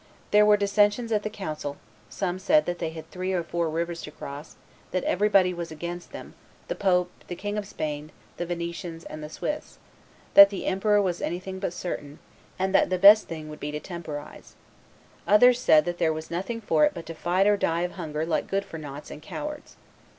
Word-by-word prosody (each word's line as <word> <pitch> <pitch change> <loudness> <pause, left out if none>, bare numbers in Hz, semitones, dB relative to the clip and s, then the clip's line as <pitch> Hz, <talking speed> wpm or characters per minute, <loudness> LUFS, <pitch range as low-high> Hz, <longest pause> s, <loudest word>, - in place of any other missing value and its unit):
There 210 0 +6
were 210 0 +6
dissensions 205 +3 +2
at 210 -2 +2
the 215 - -3
council: 155 -8 -5 0.3
some 185 -2 -3
said 305 +11 +3
that 175 0 -3
they 165 - -2
had 160 0 -10
three 185 +1 -3
or 175 -2 0
four 170 0 -1
rivers 170 +1 -3
to - - -7
cross; 145 +1 -9 0.3
that 185 - -1
everybody 195 -2 +3
was 170 -1 -5
against 175 +3 -6
them, - - -9 0.4
the - - 0
pope, 180 -2 +1 0.2
the 175 - -5
King 205 +3 -4
of 210 -2 -3
Spain, 150 -4 -5 0.3
the 175 - -2
Venetians, 170 -1 -5
and 155 0 -8
the 150 - -6
Swiss; 300 - -5 0.6
that 200 0 +11
the 200 - -5
emperor 205 +2 +2
was 180 -4 -1
anything 190 +2 -4
but 190 - -2
certain, 150 -5 -6 0.4
and 190 0 -1
that - - +4
the 185 - +1
best 205 +3 +8
thing 155 -2 -6
would 150 0 -9
be 145 - -4
to 150 0 -4
temporize: 155 -4 -8 0.7
others 245 +4 +6
said 155 -10 +5
that 175 0 -3
there 165 -2 +3
was 155 +1 -6
nothing 195 +7 -3
for 225 - +2
it 300 - +3
but 165 - -7
to 165 - -6
fight 180 +4 +1
or 205 0 +5
die 170 -4 0
of 180 0 -1
hunger 155 -3 -4
like 165 -1 -1
good 195 0 0
for 165 - -8
noughts 145 -1 -8
and 150 - -9
cowards. 300 - -7
175 Hz, 210 wpm, -26 LUFS, 160-200 Hz, 0.7 s, that